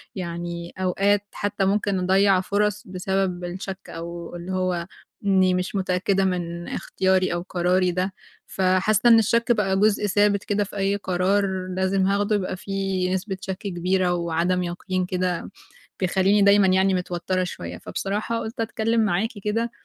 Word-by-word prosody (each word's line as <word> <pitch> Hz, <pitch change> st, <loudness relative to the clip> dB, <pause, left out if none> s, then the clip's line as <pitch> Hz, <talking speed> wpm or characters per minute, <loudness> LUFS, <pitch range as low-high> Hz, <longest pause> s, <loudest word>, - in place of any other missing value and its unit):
يعني، 170 Hz, -1 st, -5 dB
أوقات، 195 Hz, +2 st, +1 dB
حتى 205 Hz, -1 st, -1 dB
ممكن 200 Hz, -1 st, +1 dB
أضيِّع 190 Hz, +1 st, +3 dB
فرص 205 Hz, +1 st, 0 dB
بسبب 185 Hz, -1 st, -2 dB
الشك، 190 Hz, +2 st, -6 dB
أو 170 Hz, +1 st, -7 dB
اللي 175 Hz, +2 st, -6 dB
هو، 185 Hz, -2 st, -1 dB, 0.4 s
إنِّي 190 Hz, -2 st, +4 dB
مش 180 Hz, +2 st, -2 dB
متأكِّدة 190 Hz, +1 st, +1 dB
من 175 Hz, -2 st, -3 dB
اختياري 185 Hz, -1 st, 0 dB
أو 175 Hz, -, -2 dB
قراري 180 Hz, 0 st, +2 dB
ده. 185 Hz, +2 st, -2 dB, 0.3 s
فحاسَّة 190 Hz, +5 st, +2 dB
إن 225 Hz, -1 st, +8 dB
الشك 235 Hz, +3 st, +2 dB
بقى 195 Hz, -4 st, +2 dB
جزء 210 Hz, 0 st, +3 dB
ثابت 205 Hz, 0 st, +2 dB
كده 205 Hz, 0 st, 0 dB
في 205 Hz, +1 st, -9 dB
أي 195 Hz, +1 st, +1 dB
قرار، 190 Hz, 0 st, 0 dB
لازم 190 Hz, 0 st, +1 dB
هاخده، 205 Hz, +2 st, +1 dB
يبقى 185 Hz, -1 st, -2 dB
في 195 Hz, -1 st, -2 dB
نسبة 190 Hz, 0 st, -3 dB
شك 190 Hz, -1 st, -4 dB
كبيرة 185 Hz, -2 st, 0 dB
وعدم 170 Hz, +1 st, 0 dB
يقين 180 Hz, +1 st, -2 dB
كده، 180 Hz, 0 st, -2 dB, 0.5 s
بيخلِّيني 195 Hz, +2 st, +3 dB
دايمًا 200 Hz, 0 st, +6 dB
يعني، 190 Hz, +1 st, +3 dB
متوتِّرة 180 Hz, 0 st, -1 dB
شوية. 180 Hz, -, -6 dB
فبصراحة، 210 Hz, +4 st, -3 dB
قُلت 225 Hz, +1 st, -6 dB
أتكلَّم 225 Hz, 0 st, 0 dB
معاكِ 205 Hz, +3 st, +1 dB
كده 230 Hz, +3 st, -1 dB
190 Hz, 150 wpm, -24 LUFS, 180-200 Hz, 0.5 s, إن